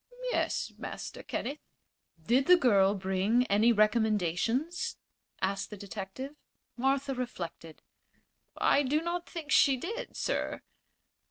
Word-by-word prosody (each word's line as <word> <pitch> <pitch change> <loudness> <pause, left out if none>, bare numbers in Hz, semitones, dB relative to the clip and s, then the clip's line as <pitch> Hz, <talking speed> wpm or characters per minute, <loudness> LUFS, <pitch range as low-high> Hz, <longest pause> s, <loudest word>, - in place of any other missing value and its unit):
"Yes, - - -1
Master - - -6
Kenneth." 285 +4 -4 0.7
"Did 255 +4 +3
the 360 0 +8
girl 200 - +4
bring 195 +5 +1
any 215 +4 +5
recommendations?" 220 - +1 0.5
asked 195 +1 -1
the 210 - -8
detective. 200 +7 -7 0.4
Martha 270 +2 +1
reflected. 175 -10 -6 0.7
"I 285 - +4
do 295 +3 +1
not 345 +1 -3
think 315 -4 -6
she 275 -2 +5
did, 435 - -5
sir." - - -2
240 Hz, 110 wpm, -30 LUFS, 200-280 Hz, 0.7 s, the